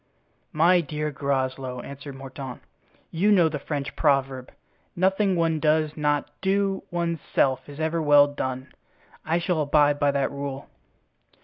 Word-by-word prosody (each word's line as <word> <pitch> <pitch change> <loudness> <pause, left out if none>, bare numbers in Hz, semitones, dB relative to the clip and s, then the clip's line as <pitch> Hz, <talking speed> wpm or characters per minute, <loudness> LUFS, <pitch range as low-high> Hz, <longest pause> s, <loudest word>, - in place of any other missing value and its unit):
"My 175 +3 +4
dear 150 0 -4
Groslow," 130 -2 -2
answered 140 +1 -9
Mordaunt, 135 -1 -8 0.5
"you 195 +6 +2
know 175 -5 +5
the 150 -2 -4
French 145 0 -4
proverb, 135 -2 0 0.4
'Nothing 190 +2 +2
one 165 -2 +1
does 155 0 +1
not 145 -2 0
do 195 0 0
one's 170 -1 -2 0.2
self 130 +1 +1
is 145 +1 -10
ever 160 +1 0
well 145 -1 +6
done.' 130 -2 -5 0.5
I 165 +2 0
shall 175 -2 0
abide 145 0 +3
by 145 - +3
that 140 -1 0
rule." 140 -1 -6
145 Hz, 140 wpm, -25 LUFS, 140-165 Hz, 0.5 s, well